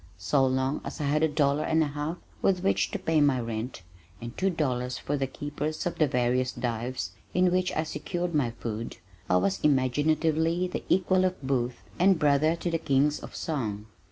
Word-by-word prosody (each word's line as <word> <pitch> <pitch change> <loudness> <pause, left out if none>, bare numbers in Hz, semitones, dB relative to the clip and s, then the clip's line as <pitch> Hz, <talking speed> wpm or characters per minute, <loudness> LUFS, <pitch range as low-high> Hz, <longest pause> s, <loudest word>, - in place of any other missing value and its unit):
So 140 -2 +2
long 130 +2 0
as - - -7
I - - -2
had 145 +2 +1
a 160 - +5
dollar 145 -1 +1
and 160 +1 +2
a 150 - -1
half 150 +4 -3 0.2
with 185 -1 +2
which 195 - +2
to - - -3
pay 160 -5 +1
my 140 -3 +3
rent 115 -2 -4 0.4
and 120 0 -7
two 195 - +1
dollars 125 -7 -1
for 145 - -2
the 135 -2 -1
keepers 145 +3 -4
of 175 - -3
the 155 - +4
various 125 -1 +1
dives 120 +1 -3 0.2
in 180 0 +4
which 185 0 +1
I 155 - 0
secured 170 +3 -3
my 145 -6 +2
food, 115 -1 -5 0.3
I 90 - +4
was 95 +1 +1
imaginatively 155 +5 +2
the 180 - -4
equal 185 0 +3
of 185 0 0
Booth 125 -2 -1 0.2
and 190 +1 +5
brother 150 +1 +3
to 170 0 -3
the 165 - 0
kings 145 0 +2
of - - -10
song. 110 -10 -3
145 Hz, 195 wpm, -28 LUFS, 125-160 Hz, 0.4 s, a